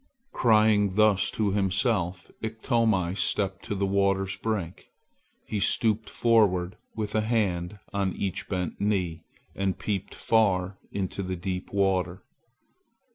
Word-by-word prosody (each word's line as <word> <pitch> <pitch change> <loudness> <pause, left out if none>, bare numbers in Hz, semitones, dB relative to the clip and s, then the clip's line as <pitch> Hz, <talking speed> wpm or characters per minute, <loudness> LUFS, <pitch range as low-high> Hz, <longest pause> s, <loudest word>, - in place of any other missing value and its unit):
Crying 105 -4 +3
thus 105 -2 +4
to 105 -3 0
himself, 95 -2 0
Iktomi 110 -5 +1
stepped 95 -2 -1
to 105 - -3
the 100 0 0
water's 100 0 +1
brink. 95 -6 -4 0.6
He 105 - -2
stooped 110 +1 +1
forward 100 -6 +2 0.2
with 105 -1 -3
a 110 - +2
hand 105 -4 0 0.2
on 100 -2 0
each 95 -3 -4
bent 90 -3 -3
knee 90 -5 -1 0.3
and 95 -1 -1
peeped 100 -2 -3
far 95 -4 +1
into 100 0 -3
the 95 -1 -3
deep 90 +1 -4
water. 95 -2 0
100 Hz, 125 wpm, -27 LUFS, 95-110 Hz, 0.6 s, thus